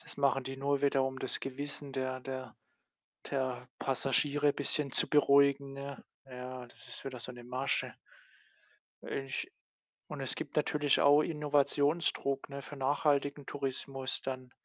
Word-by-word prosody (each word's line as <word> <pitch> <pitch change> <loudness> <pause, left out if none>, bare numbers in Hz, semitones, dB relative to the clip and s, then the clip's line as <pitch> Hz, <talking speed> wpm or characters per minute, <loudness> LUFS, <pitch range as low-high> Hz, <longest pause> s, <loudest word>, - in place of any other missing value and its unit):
das - - -10
machen 135 -2 +3
die 135 0 -5
nur 140 +1 0
wieder, 140 -1 +4
um 130 0 -1
das 130 - -1
Gewissen 140 +1 -4
der 130 -1 -2
der 130 -2 -6 0.8
der 130 -2 -1
Passagiere 140 +2 +2
bisschen 145 -1 -1
zu - - +2
beruhigen, 140 -1 +5
ne? 140 -1 -6 0.2
Ja, 125 -1 -7
das - - -16
ist - - -6
wieder 130 -3 -5
so 125 - -6
’ne 120 0 -11
Masche. 130 +2 -1 1.1
Ich 135 -1 -3 0.6
und - - -6
es - - -2
gibt - - -6
natürlich 150 -1 +3
auch 145 +1 +7
Innovationsdruck, 145 -1 +1
ne, 140 0 -5
für 145 - -9
nachhaltigen 140 +1 +1
Tourismus 135 -1 -3
dann. 130 -1 -4
135 Hz, 145 wpm, -33 LUFS, 130-145 Hz, 1.1 s, auch